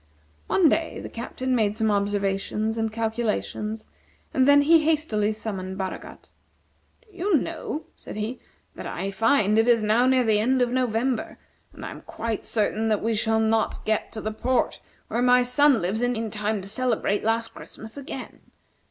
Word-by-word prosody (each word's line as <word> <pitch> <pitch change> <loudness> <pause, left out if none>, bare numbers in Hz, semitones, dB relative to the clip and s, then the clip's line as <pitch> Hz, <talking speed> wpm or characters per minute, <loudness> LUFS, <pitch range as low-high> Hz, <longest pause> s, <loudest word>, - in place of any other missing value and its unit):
One 360 - +4
day 320 +2 0
the - - -7
Captain 255 +2 -3
made 215 -2 +1
some 220 -1 +2
observations 205 +2 -1
and 225 -1 0
calculations, 220 -1 -2 0.5
and 260 0 +3
then 285 0 +7
he 325 +3 +6
hastily 300 -10 +1
summoned 190 -3 -5
Baragat. 190 -1 -6 0.8
"Do 425 -5 -24
you 365 -1 +2
know," 315 +1 -4
said - - -9
he, 215 +4 -4 0.3
"that - - -7
I 195 - -3
find 220 0 +3
it 225 - +3
is 235 -2 +4
now 225 +4 +3
near 260 -1 +4
the 215 -2 +3
end 255 +4 +2
of 245 -1 +2
November, 250 -1 0 0.3
and - - -9
I - - -5
am - - -10
quite 230 -2 -4
certain 220 0 0
that 215 -2 +1
we 225 +1 +1
shall 220 +1 +1
not 220 0 0
get 220 -1 0
to 220 - -5
the 215 - -2
port 250 +3 0 0.3
where 235 - -1
my 250 0 +5
son 255 -2 +3
lives 200 +6 -1
in 230 -3 -1
time 210 -1 -2
to - - -8
celebrate 225 -2 0
last 225 +1 +1
Christmas 220 0 -10
again. 275 -2 -7
225 Hz, 175 wpm, -25 LUFS, 215-255 Hz, 0.8 s, then